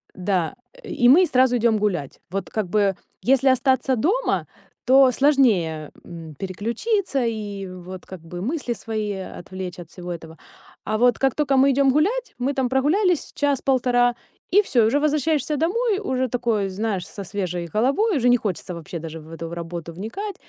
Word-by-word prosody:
да. 185 0 -1 0.3
И 285 - +1
мы 355 +7 +7
сразу 255 -5 +3
идём 230 -1 +2
гулять. 180 -10 -2
Вот 195 -1 -3
как 215 -2 -2
бы 200 -1 +1 0.2
если 270 +2 +3
остаться 260 0 +2
дома, 395 - 0 0.4
то 265 0 +6
сложнее, 210 - +2
м, 165 -3 -10
переключиться 240 - -1
и, 205 -3 -4
вот, 185 0 -9
как 185 - -9
бы 175 +2 -8
мысли 255 - -2
свои 215 -3 -3
отвлечь 185 -1 -7
от 170 - -10
всего 180 0 -8
этого. 160 -1 -8 0.5
А 215 +1 -1
вот 245 0 +4
как 270 -2 +2
только 280 -3 +1
мы 270 +1 +5
идём 275 0 +3
гулять, 420 - 0
мы 270 +3 0
там 265 -2 0
прогулялись 315 - +1
час-полтора, 255 -4 +2 0.4
и 405 +3 +6
всё, 245 - +2
и 215 - +4
уже 285 +6 +2
возвращаешься 300 0 +1
домой, 390 - +1
уже 260 -10 -1
такой, 230 -5 0
знаешь, 195 -1 -3
со 200 - -8
свежей 180 -3 -3
головой, 280 - +2
уже 245 - +2
не 245 0 +6
хочется 185 -4 -4
вообще 170 0 -7
даже 165 0 -7
в 155 +1 -14
эту 165 +1 -6
работу 170 -1 -6
вникать. 345 - -5
235 Hz, 170 wpm, -23 LUFS, 185-275 Hz, 0.5 s, мы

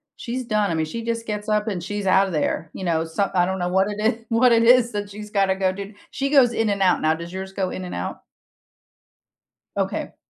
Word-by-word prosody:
she's 250 +1 -5
done, 210 -5 +1
I - - 0
mean, 160 0 0
she 230 +9 -6
just 230 0 -3
gets 210 0 -4
up 210 +1 +1
and 180 -5 -3
she's 205 +1 -4
outta 190 0 +4
there, 155 +1 -1
you 190 - -7
know, 165 -2 +1
some 195 +5 -1
I 180 -1 +3
don't 190 0 -2
know 175 - -1
what 190 +2 +2
it 205 - -5
i 225 +1 0
what 235 +2 +4
it 230 0 +5
is 240 0 +5
that 205 0 -3
she's 210 +1 -9
gotta 195 -2 +2
go 190 -1 +1
do; 200 +2 -7 0.2
she 275 0 -2
goes 265 -5 +5
in 225 -1 +1
and 200 -1 -1
out 180 -2 +3
now, 155 0 +3
does 170 +2 -8
yours 190 0 -5
go 190 -2 -1
in 185 - -5
and 180 - -6
out? 90 - -5 1.6
Okay. - - -2
200 Hz, 245 wpm, -23 LUFS, 185-225 Hz, 1.6 s, it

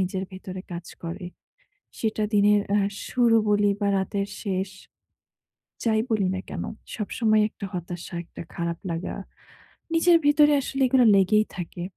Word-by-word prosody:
নিজের 190 +1 -1
ভেতরে 185 0 -7
কাজ 170 0 -6 0.2
করে। 170 +2 -5 0.7
সেটা 220 -1 0
দিনের 205 0 +5
আহ 200 -1 +3 0.2
শুরু 240 -2 +3
বলি 205 0 +3
বা 205 - +1
রাতের 200 +1 -1
শেষ, 190 -2 -2 1.1
যাই 220 -2 +2
বলি 205 -4 +2
না - - -3
কেন, - - -4 0.3
সবসময় 215 0 +1
একটা 200 - -8
হতাশা, 175 -1 -6
একটা - - -11
খারাপ 170 0 -3
লাগা। 165 +2 -4 0.8
নিজের 335 +1 +5
ভিতরে 295 0 +6
আসলে 270 +1 -2
এগুলা 255 -1 +4
লেগেই 210 +3 +4
থাকে। 175 0 -6
205 Hz, 140 wpm, -25 LUFS, 185-225 Hz, 1.1 s, ভিতরে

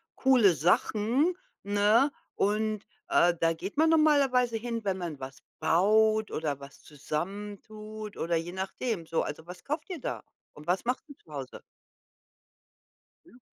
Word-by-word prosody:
coole 245 -9 +5
Sachen, 220 - +2 0.3
ne? 205 +7 +3 0.2
Und, 215 +1 0 0.3
äh, 175 0 +4
da 165 0 +3
geht 190 +9 -7
man 320 +1 +5
normalerweise 275 -7 +4
hin, 230 0 -4
wenn 195 -2 -1
man 170 -6 -5
was 135 0 -8 0.2
baut 215 +7 +3
oder 150 -3 -2
was 140 0 -13
zusammen 195 +8 -5
tut 215 -1 -9
oder 170 0 0
je 170 +2 -4
nachdem. 190 0 -3
So, 165 +1 0
also, 155 +2 -5
was 180 0 -10
kauft 305 +4 -4
ihr 355 -5 -5
da? - - -4 0.3
Und 150 - -13
was 185 +5 0
macht 250 +1 -1
ihr 285 - -12
zu 155 - -21
Hause? 135 -3 -7 1.6
Ja. 255 -7 -19
205 Hz, 150 wpm, -29 LUFS, 170-240 Hz, 1.6 s, coole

